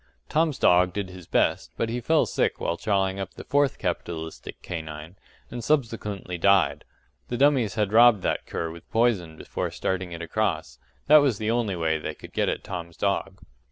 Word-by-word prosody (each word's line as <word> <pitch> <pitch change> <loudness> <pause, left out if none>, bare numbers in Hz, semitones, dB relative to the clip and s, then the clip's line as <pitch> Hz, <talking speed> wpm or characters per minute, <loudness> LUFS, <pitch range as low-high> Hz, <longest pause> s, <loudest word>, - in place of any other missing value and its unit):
Tom's 155 -3 +1
dog 90 0 +4
did 100 -3 -4
his 90 -2 -11
best; - - +1
but 115 - 0
he 120 +2 -3
fell 160 +6 +3
sick - - 0
while 85 - -1
chawing 95 0 0
up 95 -2 -6
the - - -8
fourth 145 -2 +1
capitalistic 85 -3 -5
canine, 80 0 -7 0.4
and 120 -1 -5
subsequently 110 - -1
died. 80 -6 +3 0.4
The 120 - -3
dummies 135 -6 +3
had 105 -2 0
robbed 115 -3 +6
that - - -1
cur 80 -1 -3
with 85 0 -13
poison 105 -9 +1
before - - -4
starting 95 -1 -3
it 85 0 -6
across 85 - -2 0.3
that 150 +2 +8
was 140 -7 +3
the 110 +1 -1
only 115 -5 0
way 80 -2 0
they - - -5
could - - -13
get - - +1
at - - -3
Tom's 85 -1 -7
dog. 100 -1 -1
100 Hz, 185 wpm, -25 LUFS, 85-115 Hz, 0.4 s, that